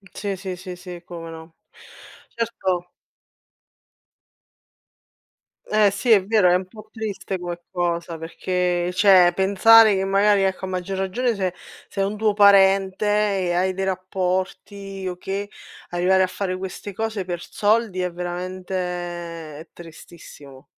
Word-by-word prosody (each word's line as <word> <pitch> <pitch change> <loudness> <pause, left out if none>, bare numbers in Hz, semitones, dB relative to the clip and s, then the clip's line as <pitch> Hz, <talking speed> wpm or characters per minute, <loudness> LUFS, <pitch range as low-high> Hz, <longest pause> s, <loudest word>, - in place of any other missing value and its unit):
Sì, 200 -1 -3
sì, 185 -1 -5
sì, 180 0 -8
sì, 180 -1 -10
come 165 -2 -8
no. 160 0 -12 0.8
Certo 190 -6 -2 2.8
Eh 210 -1 +3
sì, 215 +5 -1
è 205 -4 +6
vero, 210 -3 +4
è 175 - +4
un 185 0 -2
po' 215 +2 -14
triste 205 -4 -5
come 175 -1 -6
cosa 170 -2 -2
perché 180 +1 -1
cioè 185 -2 +6
pensare 205 +3 +6
che 190 - 0
magari 200 +1 +3
ecco, 190 0 -1
a - - -6
maggior 185 +1 -4
ragione 230 +6 0
se 190 -3 -2 0.3
se 195 - -4
è - - +3
un 200 +2 -2
tuo 215 0 +2
parente 195 -1 +4
e 205 -4 +1
hai 185 +2 +1
dei 190 +1 -2
rapporti 190 +1 -3
o 180 - -3
che, 195 +3 -5 0.4
arrivare 185 +2 +3
a - - +1
fare 185 0 -3
queste 190 +2 -7
cose 220 -1 -3
per 175 -2 -5
soldi 210 -2 0
è 180 0 -2
veramente 180 +2 -5 0.8
è 160 - -12
tristissimo. 155 -5 -14
190 Hz, 140 wpm, -22 LUFS, 180-200 Hz, 2.8 s, è